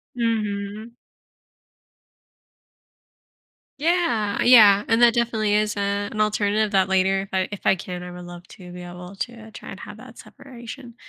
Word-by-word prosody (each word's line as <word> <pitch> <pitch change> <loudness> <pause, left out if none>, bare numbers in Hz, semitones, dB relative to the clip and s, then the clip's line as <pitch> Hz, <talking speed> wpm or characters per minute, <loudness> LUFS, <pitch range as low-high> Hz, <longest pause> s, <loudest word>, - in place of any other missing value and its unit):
Mhm. 215 -1 -3 2.8
Yeah, 290 - 0
yeah. 210 -5 +7
And 230 +1 +2
that 235 -1 +6
definitely 225 -3 0
is 210 0 +1
a 205 - -4 0.3
an 215 -1 -3
alternative 210 0 0
that 190 -1 +2
later 190 0 +2
if 195 - -13
I 185 0 0
if 205 - -6
I - - +4
can, 180 0 -7
I 180 - -8
would 180 0 -10
love 175 0 -11
to 180 -2 -13
be 180 0 -9
able 180 +2 -10
to 230 -1 -7
try - - -11
and 195 - -9
have 210 0 -10
that 245 0 -14
separation. 240 -1 -12
210 Hz, 155 wpm, -23 LUFS, 190-230 Hz, 2.8 s, yeah